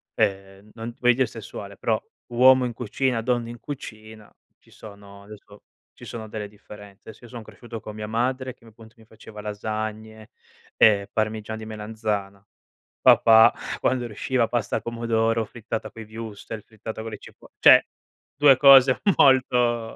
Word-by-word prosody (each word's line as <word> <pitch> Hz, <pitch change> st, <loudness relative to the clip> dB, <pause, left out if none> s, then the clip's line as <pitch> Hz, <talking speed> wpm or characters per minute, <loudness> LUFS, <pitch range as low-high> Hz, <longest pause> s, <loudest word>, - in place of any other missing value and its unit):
ehm, 100 Hz, -1 st, -2 dB
non 115 Hz, +1 st, -7 dB
ti -, -, -35 dB
voglio 125 Hz, -1 st, +5 dB
dire 130 Hz, +1 st, +2 dB
sessuale, 100 Hz, -3 st, -9 dB
però 110 Hz, -2 st, -1 dB, 0.3 s
uomo 130 Hz, +1 st, +5 dB
in 120 Hz, -, -4 dB
cucina, 125 Hz, +1 st, -2 dB
donna 120 Hz, -1 st, -1 dB
in 120 Hz, -1 st, -9 dB
cucina, 110 Hz, -6 st, -10 dB, 0.3 s
ci -, -, -26 dB
sono 100 Hz, -1 st, -14 dB
adesso 105 Hz, 0 st, -15 dB, 0.3 s
ci -, -, -13 dB
sono 110 Hz, -2 st, -8 dB
delle 105 Hz, -1 st, -6 dB
differenze. 105 Hz, -1 st, -15 dB
Adesso 110 Hz, +2 st, -13 dB
io -, -, -14 dB
son 120 Hz, -2 st, -8 dB
cresciuto 115 Hz, +1 st, -10 dB
con 105 Hz, -, -9 dB
mia 105 Hz, 0 st, -6 dB
madre 125 Hz, +3 st, -2 dB
che -, -, -30 dB
m -, -, -15 dB
appunto 110 Hz, +1 st, -18 dB
mi 110 Hz, -, -19 dB
faceva 110 Hz, -1 st, -13 dB
lasagne, 110 Hz, +1 st, -6 dB, 0.5 s
ehm, 100 Hz, -2 st, +4 dB
parmigiana 110 Hz, 0 st, -3 dB
di 110 Hz, -, -8 dB
melanzana. 105 Hz, -2 st, -5 dB, 0.6 s
Papà 110 Hz, 0 st, +6 dB, 0.3 s
quando 125 Hz, -1 st, 0 dB
riusciva 115 Hz, +2 st, -1 dB
pasta 120 Hz, 0 st, -2 dB
al -, -, -6 dB
pomodoro, 115 Hz, -1 st, 0 dB
frittata 115 Hz, 0 st, -6 dB
coi 115 Hz, -, -10 dB
wurstel, 110 Hz, -1 st, -8 dB
frittata 110 Hz, 0 st, -9 dB
con 115 Hz, 0 st, -7 dB
le -, -, -7 dB
cipo -, -, -16 dB
cioè -, -, +7 dB, 0.5 s
2 140 Hz, -2 st, +6 dB
cose 135 Hz, -2 st, +7 dB, 0.2 s
molto, 125 Hz, -4 st, +2 dB
110 Hz, 160 wpm, -24 LUFS, 105-120 Hz, 0.6 s, cioè